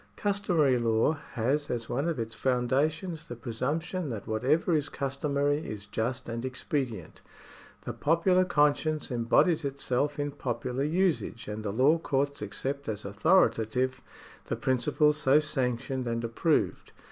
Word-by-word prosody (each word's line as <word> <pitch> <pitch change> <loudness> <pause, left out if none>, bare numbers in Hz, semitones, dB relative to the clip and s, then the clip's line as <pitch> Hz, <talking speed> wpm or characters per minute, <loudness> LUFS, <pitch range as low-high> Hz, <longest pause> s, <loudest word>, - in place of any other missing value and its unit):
Customary 180 - +2
law 115 +3 +2 0.2
has 135 +5 0
as 115 -2 -3
one 140 +6 -1
of 170 - -1
its 115 -1 -4
foundations 150 +7 0
the 120 - -6
presumption 140 +8 -3
that 110 -5 -5
whatever 135 +11 +1
is 145 -2 0
customary 140 +1 0
is 105 -9 -7
just 115 +4 -3
and 115 0 -4
expedient. 130 - -4 0.6
The - - -4
popular 175 +4 +3
conscience 150 -2 +1
embodies 140 +8 +3
itself 140 +1 -1
in 145 0 -2
popular 130 -1 -3
usage, 165 -8 0
and 105 +1 -4
the 105 -2 -3
law 135 +9 +4
courts 140 -2 -1
accept 135 +7 -4
as 105 -1 -4
authoritative 125 - +2 0.5
the - - -1
principles 150 +4 +2
so 140 0 +4
sanctioned 130 -3 -2
and 115 0 -2
approved. 115 +8 0
135 Hz, 135 wpm, -29 LUFS, 120-150 Hz, 0.6 s, law